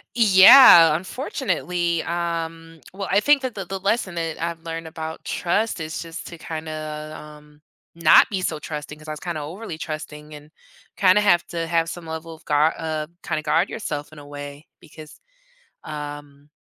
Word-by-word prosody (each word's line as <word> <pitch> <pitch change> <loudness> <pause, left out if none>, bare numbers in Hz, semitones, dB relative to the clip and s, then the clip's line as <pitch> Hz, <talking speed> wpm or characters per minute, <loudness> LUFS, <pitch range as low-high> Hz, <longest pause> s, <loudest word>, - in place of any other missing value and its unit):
Yeah, 190 - +8
unfortunately, 175 - -2
um, 165 -1 -4
well, 195 0 -5
I 200 - +4
think 290 +5 +3
that 255 -3 -3
the 195 -2 -5
the 195 +2 -5
lesson 195 -1 -1
that 165 -2 -4
I've 165 -1 -4
learned 165 0 -6
about 160 0 -7
trust 205 +4 -1
is 155 0 -5
just 165 +1 -8
to 170 - -10
kinda, 155 -1 -6
um, 150 0 -15 0.3
not 165 -1 +6
be 190 -3 -2
so 165 -3 -2
trusting 150 0 -7
'cause 155 +1 -15
I - - -4
was 155 - -6
kinda 170 -4 -4
overly 170 +3 -7
trusting 155 -1 -7
and 150 +1 -13 0.4
kinda 190 +1 +4
have 175 -5 +3
to 165 -1 -4
have 165 0 0
some 175 -1 -8
level 160 +1 -7
of 160 - -17
guar 150 +2 +2
uh, 155 -1 -3 0.2
kinda 155 -2 -3
guard 165 +4 +1
yourself 145 -7 -5
in 155 - -12
a 145 - -12
way 145 +1 -9
because, 155 -1 -14 0.6
um, 145 -1 -8
165 Hz, 175 wpm, -22 LUFS, 155-175 Hz, 0.6 s, Yeah